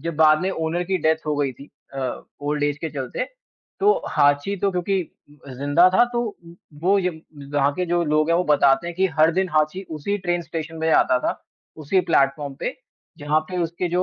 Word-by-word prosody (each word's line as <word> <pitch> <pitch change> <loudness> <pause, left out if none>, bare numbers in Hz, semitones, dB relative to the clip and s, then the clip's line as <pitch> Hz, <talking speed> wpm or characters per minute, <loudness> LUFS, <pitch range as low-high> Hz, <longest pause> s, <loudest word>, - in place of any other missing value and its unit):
जब 165 +1 -4
बाद 155 0 +5
में 190 - 0
ओनर 165 -1 -2
की 185 +1 -1
डेथ 160 0 0
हो 150 - 0
गई 140 -2 0
थी 140 +4 -14 0.2
अ, 130 -2 -3 0.2
ओल्ड 145 0 -1
एज 145 0 -1
के 160 +1 -4
चलते। 135 -4 -4 0.5
तो 410 +2 +5 0.2
हाँची 145 +7 +2
तो 200 +1 0
क्योंकि 185 +2 0 0.5
अ, - - -9
ज़िंदा 145 +7 +4
था 240 - +6
तो 240 - 0
उ 195 -7 -7 0.3
वो 195 +3 +4
य 180 - +1 0.5
वहाँ 140 0 +3
के 180 - -1
जो 175 0 +1
लोग 155 0 +1
हैं, 170 - +4
वो 180 - +1
बताते 145 +1 +3
हैं 175 - -5
कि 190 +1 +3
हर 155 +1 +6
दिन 185 +2 0
हाँची 155 +4 +1
उसी 160 +6 -2
ट्रेन 175 -2 -1
स्टेशन 165 -1 -6
पे 160 - 0
आता 125 - +4
था, - - -1 0.4
उसी 155 +5 +1
प्लेटफॉर्म 140 -4 +1
पे, - - -2 0.5
जहाँ 150 +2 +1
पे 180 - -3
उसके 170 +2 -2
जो 180 +2 +1
160 Hz, 215 wpm, -22 LUFS, 145-180 Hz, 0.5 s, था